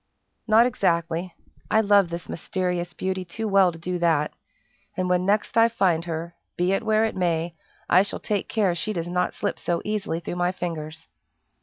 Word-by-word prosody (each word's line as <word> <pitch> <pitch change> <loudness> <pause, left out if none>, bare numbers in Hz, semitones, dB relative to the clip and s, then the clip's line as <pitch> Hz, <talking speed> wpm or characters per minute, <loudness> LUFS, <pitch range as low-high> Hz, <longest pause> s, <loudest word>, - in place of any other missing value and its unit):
"Not 225 +2 +6
exactly. 170 -6 0 0.3
I 220 - +4
love 200 -3 +4
this 170 0 -6
mysterious 180 0 -2
beauty 190 0 -2
too 220 +6 -4
well 195 -3 +5
to 165 - -11
do 180 +2 -3
that; 160 -3 +2 0.6
and 185 - 0
when 180 +1 +2
next 205 +1 +1
I 230 +1 +6
find 180 -7 +1
her, 170 0 -4 0.2
be 180 +2 +2
it 195 - +1
where 220 0 +2
it 220 - -3
may, 170 -2 0 0.3
I 180 - +6
shall 200 - -3
take 205 -2 -2
care 200 -5 +2
she 215 +6 -2
does 170 -3 -3
not 180 +1 -1
slip - - -2
so 170 -1 -1
easily 210 -6 -2
through 170 +1 -5
my 175 +1 +1
fingers." 160 -3 -5
180 Hz, 185 wpm, -25 LUFS, 170-200 Hz, 0.6 s, Not